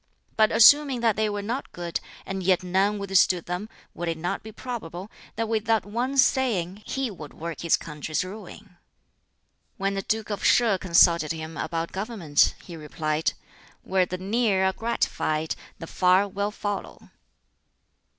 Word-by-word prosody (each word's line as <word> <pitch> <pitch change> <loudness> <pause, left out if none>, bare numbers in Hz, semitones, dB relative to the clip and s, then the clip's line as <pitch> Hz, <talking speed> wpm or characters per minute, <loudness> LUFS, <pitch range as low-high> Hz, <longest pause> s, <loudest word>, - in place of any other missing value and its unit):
But 215 -1 +4
assuming 275 +1 +6
that 225 -3 +3
they 215 0 +1
were 205 -1 -3
not 240 +7 -4
good, 175 -1 -4 0.3
and 195 0 -4
yet 185 0 +2
none 190 +3 +1
withstood 195 -3 +2
them, 180 +5 -4 0.2
would 175 - -5
it 165 -1 -1
not 175 +2 -3
be 220 - -10
probable 210 -6 -7 0.2
that 225 - -1
with 220 -1 -1
that 225 -3 +2
one 245 +6 -2
saying 215 -8 +2
he 265 -3 -2
would 155 -6 -10
work 165 -1 -6
his 170 - +3
country's 155 +2 -4
ruin?" 190 -1 -11 1.0
When 195 0 -1
the 195 - -2
Duke 215 +2 -2
of 205 - -4
Sheh 225 -6 +4
consulted 170 -3 +4
him 160 0 -7
about 165 0 -3
government, 195 -7 +1
he 175 - -9
replied, 155 0 -2 0.5
"Where 185 -1 +1
the 185 - -4
near 195 0 +1
are 190 - +2
gratified, 160 -8 -1 0.2
the - - -7
far 185 +4 +3
will 200 +1 -2
follow." 205 -1 -6
195 Hz, 160 wpm, -25 LUFS, 170-220 Hz, 1.0 s, assuming